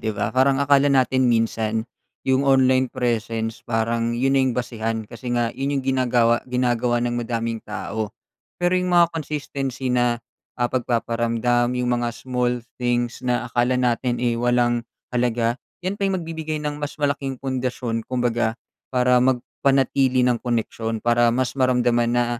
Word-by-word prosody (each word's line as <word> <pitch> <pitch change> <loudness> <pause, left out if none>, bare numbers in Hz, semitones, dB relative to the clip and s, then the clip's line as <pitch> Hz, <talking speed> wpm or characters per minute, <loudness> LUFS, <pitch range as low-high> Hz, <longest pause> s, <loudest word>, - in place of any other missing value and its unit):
'di 110 -2 -3
ba? 100 - -1
Parang 135 +1 +3
akala 140 0 +4
natin 130 -1 +3
minsan 115 -1 0 0.4
'yung 130 0 +3
online 130 -2 +3
presence 115 -2 -2
parang 115 0 -1
'yun 135 +2 +1
na 135 - +4
'yung 130 -2 0
basehan. 115 -2 -2
Kasi 120 +3 -9
nga 120 0 0
'yun, 140 +1 -2
'yung 135 - -2
ginagawa 120 -3 +2
ginagawa 125 -1 +1
ng 120 0 -1
madaming 115 -1 -2
tao. 105 +1 -4 0.5
Pero 175 0 +1
'yung 180 - -2
mga 170 -1 +5
consistency 140 -4 -3
na, 120 -1 +1 0.3
ah, 120 0 -1
pagpaparamdam, 120 0 0
'yung 125 -1 0
mga 120 - 0
small 125 -2 -1 0.2
things 120 -1 0
na 125 -1 0
akala 120 +1 +1
natin, 125 0 +1
eh, 120 -1 0
walang 120 -1 +2 0.3
halaga. 120 0 0 0.2
'Yan 195 +2 -3
pa 195 - +2
'yung 190 - 0
magbibigay 160 -2 -4
ng 150 0 -3
mas 145 +1 -4
malaking 140 -2 -1
pundasyon, 125 -3 -3
kumbaga, 120 -2 0 0.3
para 125 -1 +3
magpanatili 130 0 +2
ng 120 -2 +1
koneksiyon, 115 -2 -2
para 120 0 +4
mas 125 +1 0
maramdaman 120 -2 +3
na, 120 0 +2
125 Hz, 155 wpm, -22 LUFS, 120-130 Hz, 0.5 s, mga